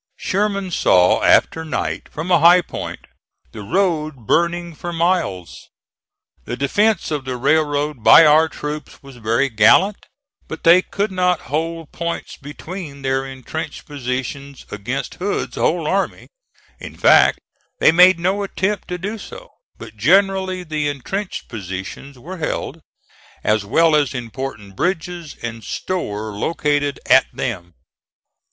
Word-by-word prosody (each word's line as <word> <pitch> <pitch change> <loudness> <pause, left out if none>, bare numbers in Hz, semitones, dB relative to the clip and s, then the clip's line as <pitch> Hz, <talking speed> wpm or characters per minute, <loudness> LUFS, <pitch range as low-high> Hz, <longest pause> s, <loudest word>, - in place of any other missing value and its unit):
Sherman 200 -1 -1
saw 90 - +3
after 160 - +3
night, 160 - -4
from 160 +5 -5
a 175 - +5
high 175 +3 +6
point, - - -7 0.5
the 110 - -9
road 155 - -1
burning 170 +4 0
for 175 +3 -6
miles. 165 - -2 0.8
The 120 - -5
defence 205 +8 +1
of 150 -3 -2
the 130 -1 -4
railroad 145 -1 0
by 115 +9 +8
our 155 +2 +5
troops 150 -1 -7
was 135 -2 -13
very 115 +4 +1
gallant, 135 - +3 0.4
but 160 - -8
they 175 +2 +7
could 200 +2 -3
not 180 -3 +1
hold 165 0 -3
points 170 0 -5
between 145 0 -9
their 135 0 -1
intrenched 135 +4 -7
positions 140 0 -5
against 120 +6 -4
Hood's 200 +2 -2
whole 170 -1 0
army; 195 +5 -2 0.5
in - - -10
fact - - +5 0.4
they - - +5
made 180 +2 +6
no 190 +4 0
attempt 200 0 -2
to 180 - -4
do 205 +5 -5
so; - - -11 0.3
but - - -11
generally 190 -2 +2
the 155 -3 -2
intrenched 185 +8 -4
positions 100 +6 -7
were 175 +9 -9
held, 160 0 -4 0.6
as 110 -1 +1
well 160 +8 +3
as 145 -3 +1
important 115 -4 -6
bridges, 175 - -3
and 115 -1 -5
store 110 - -4
located 145 +5 -1
at 130 - +5
them. 90 -8 -5
155 Hz, 135 wpm, -19 LUFS, 130-180 Hz, 0.8 s, by